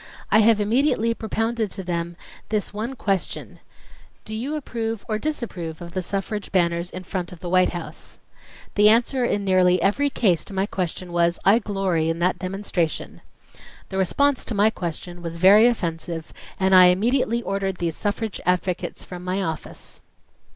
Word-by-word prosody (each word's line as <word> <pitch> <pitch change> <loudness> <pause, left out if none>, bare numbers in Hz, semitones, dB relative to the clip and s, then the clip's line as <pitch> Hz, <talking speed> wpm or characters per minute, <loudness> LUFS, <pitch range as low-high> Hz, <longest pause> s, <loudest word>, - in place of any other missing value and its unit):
I 215 - +6
have 220 0 +5
immediately 230 +1 +2
propounded 225 0 -2
to 190 - -5
them 170 -1 -3 0.3
this 210 -2 -2
one 225 +6 -4
question: 195 -7 -2 0.7
'Do 215 - -7
you 255 +8 -3
approve 230 -6 -4
or 215 -2 -1
disapprove 190 - -4
of 170 0 -8
the 185 - -2
suffrage 200 +3 -4
banners 170 -2 +1
in 185 0 -7
front 180 -1 -4
of 180 - -11
the 175 - -6
White 185 0 +4
House... 175 -2 -8 0.3
?' - - -20
The 210 +1 +6
answer 240 +3 +3
in 205 -4 0
nearly 185 -1 +4
every 245 +11 +2
case 185 - +1
to - - -9
my 190 +1 +1
question 180 -2 -4
was: 170 0 +2
'I 205 +4 +6
glory 195 -7 0
in 165 - -1
that 180 +2 0
demonstration'... 185 -3 -3 0.7
the 190 - -2
response 280 +9 +2
to 225 - -3
my 210 +2 +4
question 175 -1 -5
was 170 -1 -5
very 200 +6 +7
offensive, 170 -7 -3 0.3
and 190 0 +2
I 185 -1 +9
immediately 235 +5 +2
ordered 195 -2 -2
these 170 -2 -2
suffrage 210 0 -3
advocates 180 0 -1
from 180 -1 -9
my 185 +2 -1
office." 160 -2 -6
195 Hz, 170 wpm, -23 LUFS, 175-220 Hz, 0.7 s, I